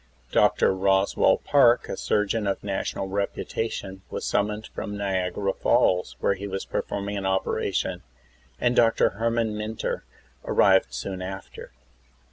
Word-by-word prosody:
Dr. - - +4
Roswell 95 +1 +3
Park, 125 -4 +4
a - - -4
surgeon 105 +2 0
of 100 - -2
national 95 -1 -3
reputation, 100 0 -3
was - - -4
sum 100 0 +2
moned 105 +1 -5
from 105 0 -5
Niagara 95 0 -1
Falls, 90 0 +2
where - - +2
he 100 +1 -6
was 95 0 -4
performing 100 0 -3
an 95 -1 -2
operation, 95 0 -1 0.6
and 120 0 +2
Dr. 115 -2 +4
Herman 115 0 -1
Mynter 105 +1 -3 0.4
arrived 95 -10 +4
soon 95 +10 -5
after. 95 +1 -8
100 Hz, 130 wpm, -25 LUFS, 95-105 Hz, 0.6 s, Dr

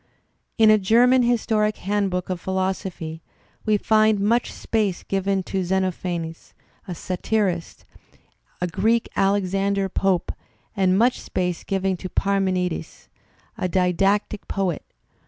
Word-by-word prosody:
In 220 -2 +6
a 215 - +5
German 245 +6 +4
historic 220 -3 +1
handbook 190 -2 -1
of 180 -2 -4
philosophy 185 -4 -3 0.5
we 215 -1 +4
find 215 0 +3
much 230 +4 +1
space 210 -5 -1
given 195 0 -1
to 190 +1 -2
Xenophanes, 175 -3 -3 0.3
a 180 - -5
satirist, 185 0 -2 0.7
a 180 - 0
Greek 215 +7 +1
Alex 195 -1 +1
ander 195 0 0
Pope, 190 -2 0 0.4
and 190 -2 +3
much 240 +4 +2
space 180 -2 -2
given 195 -1 -1
to 185 - -7
Parmenides, 185 -4 -1 0.5
a 185 - 0
didactic 195 +3 +1
poet. 190 -5 -2
195 Hz, 120 wpm, -23 LUFS, 180-210 Hz, 0.7 s, In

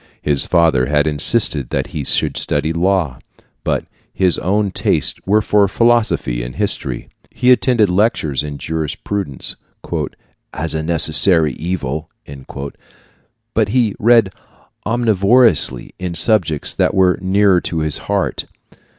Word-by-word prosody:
His 70 -2 +4
father 80 -8 +2
had 75 +1 +1
insisted 75 - +2
that - - -2
he 75 -3 -4
should - - +1
study 75 +2 -1
law; 85 -6 -1 0.4
but - - -2 0.3
his 90 -3 +1
own 100 +2 -1
tastes - - -1
were 105 +2 +2
for 105 -1 +2
philosophy 115 - +1
and - - -7
history. - - -3 0.2
He 125 +2 +1
attended 125 -4 +3
lectures 90 - 0
in 75 -1 -6
jurisprudence 80 +1 -4 1.0
"as 80 0 -2
a 80 - -2
necessary 80 -1 +3
evil," 80 -2 -4 1.4
but 110 -2 +1
he 115 -2 +1
read 115 -4 +3 0.5
omnivorously 110 - +2
in 90 -2 -5
subjects 85 -8 +1
that - - 0
were 95 -1 +2
nearer 95 -1 +2
to 80 -2 -3
his 75 -1 +1
heart. - - -1
90 Hz, 125 wpm, -17 LUFS, 75-105 Hz, 1.4 s, His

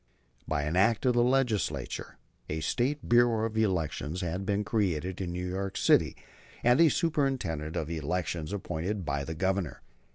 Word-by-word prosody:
By 75 -2 0
an 75 +3 -2
Act 105 +6 +3
of 125 - +4
the 120 - +3
Legislature, 120 - 0 0.3
a 80 +1 -2
State 130 - -1
Bureau 120 -2 +4
of 110 -1 -4
Elections 90 -5 -1
had 90 +2 -3
been 105 0 +1
created 95 -4 -1
in 90 -2 -3
New 90 +1 -3
York 95 +1 -3
City, - - +3 0.5
and 125 +6 +5
a 165 - +7
Superintendent 135 - 0
of 75 - -2
Elections 85 +1 -2
appointed 95 0 -3
by 70 -1 -1
the 80 +3 -5
Governor. 95 -1 -1
95 Hz, 160 wpm, -29 LUFS, 80-115 Hz, 0.5 s, a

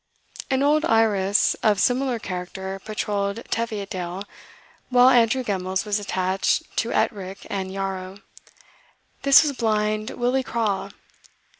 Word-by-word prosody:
An 265 0 +1
old 300 +2 +3
Irus 210 -6 +3
of 210 -3 +3
similar 255 +1 +1
character 190 -1 -6
patrolled 210 0 -2
Teviotdale, 200 -5 -3 0.7
while 250 0 +6
Andrew 245 +1 +3
Gemmells 190 -2 -2
was 210 0 0
attached 190 -1 0
to 230 - 0
Ettrick 195 -2 -2
and 190 -1 -3
Yarrow. 190 -1 -4 1.0
This 275 +2 +7
was 300 - 0
Blind 215 -2 0
Willie 250 +2 0
Craw. 215 -6 -2
210 Hz, 115 wpm, -23 LUFS, 195-235 Hz, 1.0 s, This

